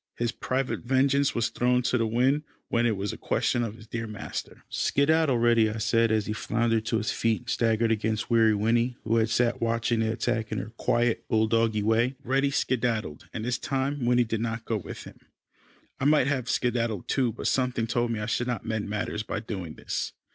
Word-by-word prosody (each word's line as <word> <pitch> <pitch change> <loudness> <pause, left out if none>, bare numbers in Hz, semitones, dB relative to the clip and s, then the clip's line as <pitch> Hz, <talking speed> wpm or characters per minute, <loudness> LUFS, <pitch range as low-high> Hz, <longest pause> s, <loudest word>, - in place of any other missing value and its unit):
His 120 0 0
private 130 +1 -2
vengeance 135 +2 +2
was 115 0 +1
thrown 125 0 +1
to 125 - +1
the 115 -2 +1
wind, 130 +6 +2 0.3
when 120 0 +2
it 110 -4 0
was 100 +1 -2
a - - -7
question 120 - 0
of 115 -2 -3
his 110 -1 -13
dear 115 0 -4
master. 105 -2 -7
"Skedaddle, 150 -2 +2
Reddy," 115 -2 +4
I 110 - -4
said 115 +1 +2
as 110 -2 +1
he 105 - -2
floundered 115 0 0
to 115 - +1
his 110 0 -1
feet, 115 -1 0
and 120 - -11
staggered 115 0 +2
against 110 0 -1
Weary 115 -2 +4
Winnie 115 +4 +1
who 115 +1 +1
had 110 -1 +2
sat 120 0 +1
watching 115 0 +1
the 110 0 +1
attack 115 -1 -2
in 110 - -2
her 105 +3 -5
quiet 120 0 0
bull 110 0 +2
doggy 110 -1 +1
way. 115 +4 +2
Reddy 135 +2 +1
skedaddled, 115 - -1
and 110 - -5
this 125 0 -1
time 135 0 -2
Winnie 120 0 +4
did 110 -1 -2
not 115 0 -3
go 115 - 0
with 100 - -8
him. - - -13 0.8
I - - -1
might 150 -2 +5
have 130 -3 -1
skedaddled 115 -5 0
too, 130 -4 +1
but - - -8
something 125 -3 +1
told 120 +1 0
me 115 -2 -2
I - - -2
should 120 +2 -1
not 120 -5 -3
mend 110 -2 -2
matters 105 0 -2
by 110 - -4
doing 95 -7 -6
this. - - -4
115 Hz, 210 wpm, -27 LUFS, 110-125 Hz, 0.8 s, might